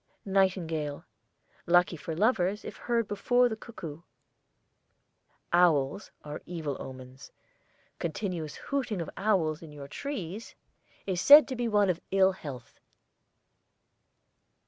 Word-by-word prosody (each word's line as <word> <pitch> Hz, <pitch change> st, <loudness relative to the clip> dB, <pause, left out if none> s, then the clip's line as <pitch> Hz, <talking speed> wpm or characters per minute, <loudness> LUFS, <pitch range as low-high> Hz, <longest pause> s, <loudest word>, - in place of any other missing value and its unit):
NIGHTINGALE. 175 Hz, -7 st, 0 dB, 0.6 s
Lucky 175 Hz, 0 st, +4 dB
for 160 Hz, +1 st, -6 dB
lovers 205 Hz, 0 st, +1 dB
if -, -, -7 dB
heard 235 Hz, -2 st, -1 dB
before 245 Hz, +5 st, +2 dB
the 225 Hz, -, -3 dB
cuckoo. 170 Hz, -9 st, -9 dB, 1.5 s
OWLS 170 Hz, 0 st, +3 dB, 0.2 s
are 150 Hz, 0 st, -6 dB
evil 160 Hz, -5 st, -4 dB
omens. 130 Hz, 0 st, -10 dB, 0.7 s
Continuous 170 Hz, -3 st, -3 dB
hooting 260 Hz, -8 st, -3 dB
of 165 Hz, -, -4 dB
owls 185 Hz, -7 st, +1 dB
in 160 Hz, -2 st, -11 dB
your 145 Hz, -2 st, -9 dB
trees 220 Hz, -, -6 dB, 0.5 s
is 185 Hz, -2 st, -1 dB
said 290 Hz, -1 st, +9 dB
to 260 Hz, -, -3 dB
be 240 Hz, -1 st, -1 dB
one 205 Hz, -2 st, +3 dB
of 170 Hz, -, -6 dB
ill 190 Hz, 0 st, +4 dB
health. 140 Hz, -10 st, -9 dB
180 Hz, 115 wpm, -29 LUFS, 155-210 Hz, 1.5 s, said